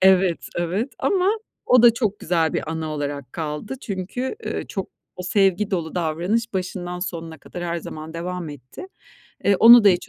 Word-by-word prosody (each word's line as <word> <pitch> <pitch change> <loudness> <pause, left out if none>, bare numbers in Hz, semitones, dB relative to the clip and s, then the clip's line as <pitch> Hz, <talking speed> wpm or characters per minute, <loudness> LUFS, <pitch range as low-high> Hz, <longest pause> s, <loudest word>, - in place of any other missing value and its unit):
Evet, 185 -2 +4
evet. 185 +10 -1
Ama 385 0 +2 0.4
o 250 -1 +6
da 235 -2 +8
çok 215 -4 -1
güzel 165 -3 +1
bir 155 - -2
anı 160 -1 -3
olarak 145 -3 -4
kaldı. 160 - -4
Çünkü, 210 - -4
ııı, - - -3
çok - - -4 0.3
o 180 - -5
sevgi 195 +2 +2
dolu 165 -4 -2
davranış 180 +7 0
başından 180 -1 -3
sonuna 165 -3 -5
kadar 175 0 -7
her 170 0 -1
zaman 155 0 -7
devam 175 -1 -4
etti. 145 - -10 0.6
Eee, 200 -1 +4
onu 235 -1 +10
da - - +9
hiç 180 -2 +2
180 Hz, 175 wpm, -23 LUFS, 160-205 Hz, 0.6 s, onu